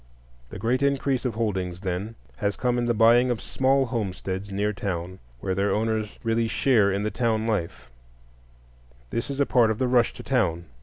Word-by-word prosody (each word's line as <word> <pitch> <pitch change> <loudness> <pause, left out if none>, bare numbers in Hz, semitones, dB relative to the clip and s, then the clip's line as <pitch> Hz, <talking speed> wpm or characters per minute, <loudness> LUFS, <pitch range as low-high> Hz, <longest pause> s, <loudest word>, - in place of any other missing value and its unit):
The - - -8
great 125 +4 0
increase 140 -2 +1
of 120 -4 -1
holdings, 95 -5 -2
then, 95 +4 -3 0.2
has 100 -1 -1
come 125 -1 0
in 120 - 0
the 120 - +1
buying 120 +3 +5
of 120 -3 -1
small 135 +1 +1
homesteads 100 -4 -4
near 105 +2 0
town, 90 -2 -4 0.2
where 95 - -1
their 100 +2 +1
owners 110 0 -1
really 115 0 +1
share 110 -4 +3
in 100 +1 -1
the 105 - -1
town 110 -3 0
life; 85 - -3 1.2
this 115 - -2
is 140 0 -4
a 140 - +4
part 120 -4 +4
of 110 - -1
the 130 - 0
rush 125 -2 +3
to - - -10
town. 90 -10 0
110 Hz, 190 wpm, -25 LUFS, 100-120 Hz, 1.2 s, buying